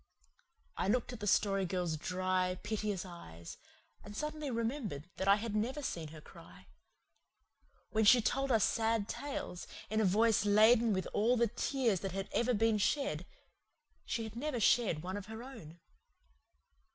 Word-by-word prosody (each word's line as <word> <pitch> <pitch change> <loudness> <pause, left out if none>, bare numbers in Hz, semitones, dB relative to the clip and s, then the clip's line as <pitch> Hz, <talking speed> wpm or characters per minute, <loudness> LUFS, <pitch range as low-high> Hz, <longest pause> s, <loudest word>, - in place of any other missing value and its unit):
I - - -1
looked 245 +3 0
at 240 - -8
the 205 - -4
Story 195 0 +2
Girl's 180 -3 -1
dry, 185 +2 -1
piteous 210 -3 -2
eyes, 85 - -10 0.5
and 205 0 -9
suddenly 300 -1 -3
remembered 230 - -3
that 190 - -2
I 200 - +7
had 215 0 -4
never 255 +7 -1
seen 165 - -3
her 155 +1 -11
cry. - - -15 1.3
When 220 0 +2
she 245 +4 +8
told 270 +4 0
us 225 -3 +4
sad 225 -2 +1
tales, 275 -10 -5 0.2
in 215 0 +2
a - - +3
voice 215 +3 +3
laden 220 +3 +5
with 185 -2 0
all 235 +4 +3
the 235 - +4
tears 235 -5 0
that 195 -1 -4
had 195 0 -4
ever 240 +1 +1
been 220 0 +2
shed, 280 +7 0 0.8
she 230 - -3
had 220 0 -8
never 265 0 -2
shed 205 -8 +3
one 185 +2 -4
of 205 -1 -8
her 220 +1 -7
own. 170 - -11
215 Hz, 165 wpm, -34 LUFS, 185-235 Hz, 1.3 s, she